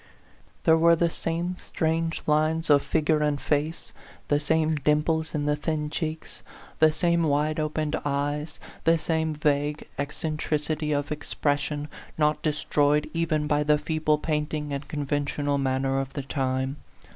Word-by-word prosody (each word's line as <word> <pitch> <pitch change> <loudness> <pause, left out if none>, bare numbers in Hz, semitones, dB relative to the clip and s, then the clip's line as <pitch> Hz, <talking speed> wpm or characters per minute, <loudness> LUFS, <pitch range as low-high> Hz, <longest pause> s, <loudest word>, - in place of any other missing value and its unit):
There 160 0 +5
were 170 +1 +6
the 170 0 +1
same 170 +3 -2
strange 165 +1 -1
lines 155 +1 +2
of 145 -1 +6
figure 155 0 +1
and 150 -1 +1
face, 150 +4 -1 0.4
the 145 - +3
same 160 +2 +2
dimples 155 +2 +1
in 145 -1 -1
the 150 0 +2
thin 150 0 -2
cheeks, 155 0 -4 0.4
the 155 0 +6
same 170 +2 +1
wide 155 0 +1
opened 155 0 -1
eyes, 145 +2 -2 0.2
the 165 0 +4
same 160 -1 -1
vague 150 0 0
eccentric 150 +1 -2
ity 155 0 -1
of 145 0 -1
expression, 145 0 -1 0.3
not 150 -1 +2
destroyed 150 -1 +1
even 165 -2 0
by 150 0 +2
the 150 0 +3
feeble 155 0 +1
painting 150 -1 -2
and 140 0 -4
conventional 145 -1 -1
manner 135 0 0
of 135 0 -4
the 140 - -4
time. 130 0 -1
150 Hz, 145 wpm, -26 LUFS, 145-160 Hz, 0.4 s, were